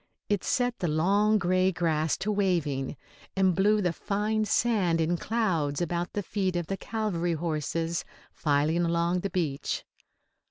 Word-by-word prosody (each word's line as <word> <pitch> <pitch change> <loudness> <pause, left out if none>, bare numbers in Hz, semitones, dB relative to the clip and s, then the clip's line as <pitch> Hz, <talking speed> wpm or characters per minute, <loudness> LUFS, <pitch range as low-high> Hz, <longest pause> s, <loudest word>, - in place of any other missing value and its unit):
It 205 -3 +1
set 245 -1 0
the 175 - 0
long 200 +7 +3
grey 185 0 +2
grass 160 -3 0
to 210 - -2
waving, 165 -9 0 0.4
and 190 -1 +3
blew 205 +3 +3
the 175 -2 +1
fine 210 +4 -1
sand 210 -6 +2
in 165 +2 +1
clouds 170 -9 0
about 175 0 -2
the 205 - -2
feet 190 -2 -1
of 175 -1 -1
the 195 - -2
cavalry 185 -6 -1
horses 165 +1 -2 0.3
filing 150 +2 +1
along 170 +1 +1
the 200 - -3
beach. 155 -6 -2
175 Hz, 150 wpm, -28 LUFS, 165-205 Hz, 0.4 s, long